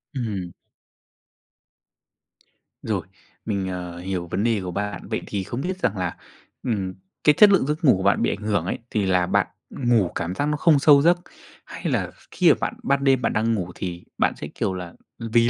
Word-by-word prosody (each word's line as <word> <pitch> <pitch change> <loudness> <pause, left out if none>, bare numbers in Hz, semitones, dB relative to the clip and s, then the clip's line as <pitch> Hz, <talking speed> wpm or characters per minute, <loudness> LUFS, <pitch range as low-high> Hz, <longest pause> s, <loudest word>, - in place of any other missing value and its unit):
Ừm. 100 -8 -3 2.3
Rồi. - - -2 0.4
Mình, 100 -3 -1
ờ, 90 -2 -5
hiểu 90 -1 -3
vấn 100 - -1
đề 115 -3 +1
của 90 - -4
bạn. 105 +2 -4
Vậy - - -2
thì 100 -2 -2
không 120 +6 -4
biết 185 +4 -3
rằng 110 - 0
là, 90 -2 -2 0.5
ừm, 95 -6 -1 0.3
cái 150 - +6
chất 210 -1 +9
lượng 190 -9 +4
giấc 155 +3 -2
ngủ 125 - +6
của 95 - -4
bạn 100 - +3
bị - - +2
ảnh 105 - -3
hưởng 100 -5 +1
ấy, - - -2
thì 105 -3 0
là 90 -1 +3
bạn - - +2 0.2
ngủ 120 -8 +2
cảm 85 +2 -2
giác 145 - 0
nó 150 0 0
không 155 -3 +4
sâu 140 -1 +7
giấc, 175 +3 +5 0.5
hay - - -10
là - - -1 0.2
khi - - +4
mà - - +6
bạn - - -1
ban 140 0 +1
đêm 135 -2 +4
bạn - - 0
đang 115 +1 +1
ngủ 90 -4 -3
thì 90 -2 -5
bạn - - +2
sẽ, - - -7
kiểu 95 - -1
là, 90 -2 -6 0.3
vì 115 +1 +2
105 Hz, 205 wpm, -23 LUFS, 95-135 Hz, 2.3 s, chất